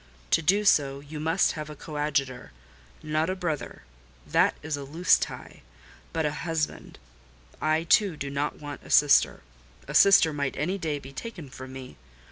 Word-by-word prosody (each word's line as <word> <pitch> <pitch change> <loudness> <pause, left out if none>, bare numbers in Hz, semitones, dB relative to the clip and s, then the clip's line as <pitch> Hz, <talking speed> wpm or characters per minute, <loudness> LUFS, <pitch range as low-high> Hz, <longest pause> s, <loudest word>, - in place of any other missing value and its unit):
To - - +4
do 200 +6 +2
so, 140 -7 +3
you 150 +2 -9
must 165 +5 +2
have 155 -1 -6
a 150 - -8
coadjutor: 145 -4 -3 0.5
not 155 +2 0
a 185 - -1
brother—that 65 - -2
is 155 -1 -2
a 140 - -6
loose 160 +6 +3
tie—but 65 - -7
a 150 - 0
husband. 165 -2 -3 0.6
I, 155 +1 +1
too, 180 0 +3
do 140 -1 -5
not 140 +1 -2
want 145 -1 -8
a - - -14
sister: 145 -1 +4 0.4
a - - -6
sister 185 -5 +6
might 140 -2 -3
any 180 +7 -1
day 155 -4 -2
be 135 -1 -11
taken 170 - -8
from 130 0 -10
me. 130 -1 -10
150 Hz, 160 wpm, -26 LUFS, 140-165 Hz, 0.6 s, sister